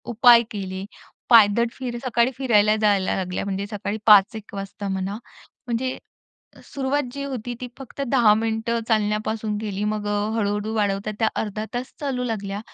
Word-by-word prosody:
उपाय 235 Hz, 0 st, +7 dB
केले. 190 Hz, -2 st, -5 dB, 0.4 s
पायदळ 230 Hz, 0 st, +6 dB
फिर 245 Hz, -2 st, -5 dB
सकाळी 235 Hz, 0 st, +2 dB
फिरायला 215 Hz, -5 st, +3 dB
जायला 200 Hz, -3 st, +2 dB
लागल्या. 185 Hz, 0 st, -3 dB
म्हणजे 200 Hz, 0 st, -3 dB
सकाळी 210 Hz, 0 st, -3 dB
5-1 210 Hz, 0 st, +5 dB
वाजता 195 Hz, +1 st, -6 dB
म्हणा. 190 Hz, +1 st, -3 dB, 0.5 s
म्हणजे 250 Hz, +2 st, -2 dB, 0.7 s
सुरुवात 280 Hz, +1 st, -1 dB
जी 280 Hz, 0 st, -5 dB
होती 245 Hz, -3 st, -5 dB
ती 250 Hz, -, -4 dB
फक्त 270 Hz, +1 st, -8 dB
10 235 Hz, -4 st, +5 dB
मिनिटं 225 Hz, +1 st, -1 dB
चालण्यापासून 215 Hz, 0 st, 0 dB
केली. 205 Hz, -2 st, -3 dB
मग 210 Hz, 0 st, -2 dB, 0.3 s
हळू-हळू 210 Hz, 0 st, -1 dB
वाढवतात 205 Hz, 0 st, -1 dB
त्या 220 Hz, -, +3 dB
अर्धा 215 Hz, 0 st, -4 dB
तास 250 Hz, +2 st, -4 dB
चालू 265 Hz, -4 st, -2 dB
लागल्या, 205 Hz, -4 st, -3 dB
215 Hz, 145 wpm, -23 LUFS, 205-240 Hz, 0.7 s, उपाय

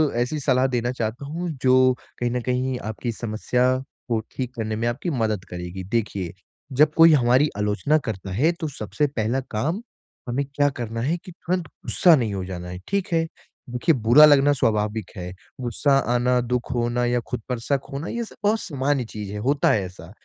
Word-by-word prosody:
ऐसी 125 Hz, +6 st, 0 dB
सलाह 130 Hz, -2 st, +2 dB
देना 120 Hz, -1 st, -1 dB
चाहता 120 Hz, +2 st, -3 dB
हूँ, 170 Hz, +4 st, -4 dB
जो 130 Hz, 0 st, +5 dB, 0.3 s
कहीं 120 Hz, 0 st, 0 dB
न 125 Hz, 0 st, -1 dB
कहीं 125 Hz, +1 st, -1 dB
आपकी 110 Hz, +2 st, -4 dB
समस्या 115 Hz, +3 st, 0 dB, 0.4 s
को 115 Hz, -, +2 dB
ठीक 125 Hz, -1 st, -4 dB
करने 110 Hz, -2 st, -2 dB
में 115 Hz, +2 st, -1 dB
आपकी 130 Hz, +9 st, -2 dB
मदद 110 Hz, -, -1 dB
करेगी। 90 Hz, +1 st, -6 dB
देखिए, 100 Hz, -4 st, -2 dB, 0.4 s
जब 150 Hz, +3 st, +4 dB
कोई 165 Hz, 0 st, +7 dB
हमारी 130 Hz, +2 st, +4 dB
आलोचना 105 Hz, +9 st, +2 dB
करता 95 Hz, -3 st, -4 dB
है, 135 Hz, -, +3 dB
तो 170 Hz, -2 st, -4 dB
सबसे 145 Hz, +2 st, -2 dB
पहला 120 Hz, -1 st, -1 dB
काम 155 Hz, -, -1 dB, 0.5 s
हमें 135 Hz, +3 st, 0 dB
क्या 145 Hz, 0 st, +3 dB
करना 115 Hz, -4 st, -4 dB
है? 130 Hz, -, 0 dB
है 175 Hz, -, +1 dB
कि 180 Hz, +1 st, -12 dB
तुरंत 180 Hz, 0 st, -3 dB
गुस्सा 170 Hz, +4 st, +3 dB
नहीं 115 Hz, -7 st, -1 dB
हो 95 Hz, -, -3 dB
जाना 90 Hz, -1 st, -6 dB
है। 90 Hz, 0 st, -6 dB
ठीक 200 Hz, 0 st, 0 dB
है? 165 Hz, 0 st, +3 dB, 0.4 s
देखिए 125 Hz, +6 st, +2 dB
बुरा 120 Hz, +6 st, +7 dB
लगना 145 Hz, -1 st, +6 dB
स्वाभाविक 105 Hz, -5 st, 0 dB
है। 90 Hz, -2 st, -6 dB, 0.3 s
गुस्सा 135 Hz, +3 st, +2 dB, 0.2 s
आना, 125 Hz, +1 st, +2 dB
दुःख 125 Hz, +1 st, -2 dB
होना 120 Hz, 0 st, 0 dB
या 120 Hz, 0 st, +1 dB
खुद 125 Hz, -, -3 dB
पर 125 Hz, -2 st, -1 dB
शक 140 Hz, +4 st, 0 dB
होना, 140 Hz, +5 st, -4 dB
ये 235 Hz, 0 st, -2 dB
सब -, -, -11 dB
बहुत 215 Hz, +2 st, +3 dB
सामान्य 140 Hz, -3 st, -1 dB
चीज़ 105 Hz, -2 st, -7 dB
है, -, -, -4 dB
होता 140 Hz, +6 st, +2 dB
है 105 Hz, -, +2 dB
ऐसा। 90 Hz, -1 st, -11 dB
125 Hz, 195 wpm, -24 LUFS, 110-145 Hz, 0.5 s, कोई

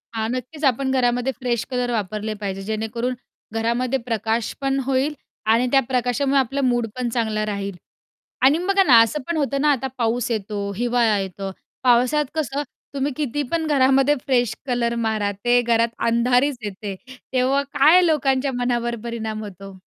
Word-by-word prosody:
हां, 220 Hz, 0 st, -1 dB
नक्कीच. 255 Hz, +5 st, -6 dB
आपण 265 Hz, +1 st, +2 dB
घरामध्ये 245 Hz, 0 st, +1 dB
फ्रेश 240 Hz, -3 st, -1 dB
कलर 250 Hz, -1 st, -1 dB
वापरले 215 Hz, 0 st, -2 dB
पाहिजे, 195 Hz, -1 st, -3 dB
जेणेकरून 220 Hz, +4 st, -2 dB, 0.4 s
घरामध्ये 240 Hz, +3 st, 0 dB
प्रकाश 225 Hz, -1 st, -2 dB
पण 270 Hz, 0 st, 0 dB
होईल 270 Hz, +3 st, +1 dB, 0.4 s
आणि 245 Hz, +2 st, +2 dB
त्या 270 Hz, -, +6 dB
प्रकाशामुळे 260 Hz, +2 st, +1 dB
आपलं 270 Hz, +2 st, -1 dB
मूड 240 Hz, -2 st, +1 dB
पण 250 Hz, -2 st, -2 dB
चांगलं 220 Hz, -2 st, -1 dB
राहील. 200 Hz, -2 st, -4 dB, 0.7 s
आणि 275 Hz, +5 st, +5 dB
बघा 395 Hz, 0 st, +4 dB
ना, 250 Hz, -9 st, +7 dB
असं 290 Hz, +6 st, 0 dB
पण 340 Hz, -2 st, -1 dB
होतं 275 Hz, -1 st, 0 dB
ना, 300 Hz, -1 st, +4 dB
आता 265 Hz, -1 st, 0 dB
पाऊस 240 Hz, 0 st, 0 dB
येतो, 205 Hz, -2 st, -3 dB
हिवाळा 240 Hz, -3 st, +2 dB
येतो. 195 Hz, 0 st, -5 dB, 0.3 s
पावसात 250 Hz, +4 st, +3 dB
कसं, 290 Hz, -2 st, -1 dB, 0.3 s
तुम्ही 280 Hz, +1 st, -1 dB
किती 290 Hz, 0 st, -1 dB
पण 330 Hz, -1 st, 0 dB
घरामध्ये 270 Hz, 0 st, +4 dB
फ्रेश 245 Hz, -5 st, +1 dB
कलर 235 Hz, -1 st, 0 dB
मारा, 210 Hz, -2 st, 0 dB
ते 240 Hz, +5 st, +2 dB
घरात 230 Hz, 0 st, +2 dB, 0.2 s
अंधारीच 245 Hz, +3 st, +2 dB
येते. 200 Hz, -1 st, -5 dB, 0.4 s
तेव्हा 265 Hz, +2 st, +2 dB
काय 355 Hz, +4 st, +6 dB
लोकांच्या 275 Hz, -4 st, +1 dB
मनावर 240 Hz, -1 st, 0 dB
परिणाम 220 Hz, -2 st, -4 dB
होतो? 195 Hz, -1 st, -9 dB
245 Hz, 155 wpm, -22 LUFS, 225-270 Hz, 0.7 s, ना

